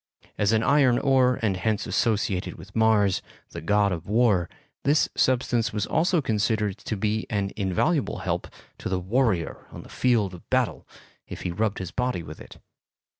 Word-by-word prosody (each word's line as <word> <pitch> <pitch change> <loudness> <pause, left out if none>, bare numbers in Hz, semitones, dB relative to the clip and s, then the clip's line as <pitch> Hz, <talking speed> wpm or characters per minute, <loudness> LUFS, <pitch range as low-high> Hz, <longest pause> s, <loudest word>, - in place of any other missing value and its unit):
As 105 0 +1
an 110 0 +2
iron 140 -4 +4
ore 130 -2 +3
and 100 -4 +1
hence 110 +2 -1
associated 105 -5 0
with 95 +5 -14
Mars, 110 -4 +3 0.3
the - - -7
god 100 +4 +2
of 85 -2 -5
war, 105 -5 +2 0.3
this 145 +3 +3
substance 120 -2 +1
was 105 -2 -1
also 170 -1 +1
considered 105 -3 0
to 110 - -4
be 110 +2 -1
an 100 -3 -1
invaluable 105 - 0
help - - -1 0.3
to - - -4
the 95 0 0
warrior 100 -2 0
on - - -10
the - - -15
field 115 -7 +1
of 90 - -13
battle - - 0 0.4
if - - -8
he 90 - -2
rubbed 105 +3 -1
his 95 -2 -5
body 125 -8 -2
with 75 0 -10
it. - - -12
105 Hz, 175 wpm, -25 LUFS, 95-125 Hz, 0.4 s, iron